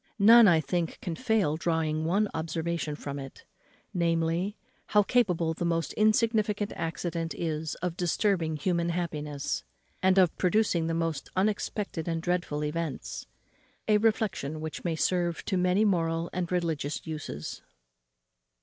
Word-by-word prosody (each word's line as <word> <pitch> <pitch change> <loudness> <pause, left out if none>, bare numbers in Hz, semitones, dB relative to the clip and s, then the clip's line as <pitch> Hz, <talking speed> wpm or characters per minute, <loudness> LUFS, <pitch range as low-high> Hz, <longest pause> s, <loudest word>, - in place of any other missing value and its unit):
None, 225 +2 +8
I 170 -3 +6
think, 165 +2 -2
can 170 - -4
fail 215 -8 +1
drawing 160 -2 0
one 200 +6 +2
observation 160 -1 -2
from 140 -1 -6
it, 135 -1 -10 0.5
namely, 170 +3 0 0.3
how 210 -1 +4
capable 180 -9 +2
the 170 - -4
most 165 -3 0
insignificant 215 -1 +2
accident 165 0 -3
is 160 -2 -3
of 180 -1 -2
disturbing 175 -3 +1
human 170 +2 0
happiness, 150 -5 -3 0.4
and 190 0 +4
of 180 -4 +5
producing 180 -3 +2
the 165 - -1
most 165 -4 -2
unexpected 200 -3 -1
and 165 -1 -1
dreadful 175 -3 -1
events. 150 -2 -4 0.6
A 210 -1 +4
reflexion 200 -9 0
which 155 0 -6
may 170 -2 0
serve 175 0 0
to - - -1
many 180 +3 +3
moral 165 -3 0
and 180 -1 -2
religious 160 -5 -1
uses. 150 - -6
170 Hz, 135 wpm, -28 LUFS, 160-190 Hz, 0.6 s, None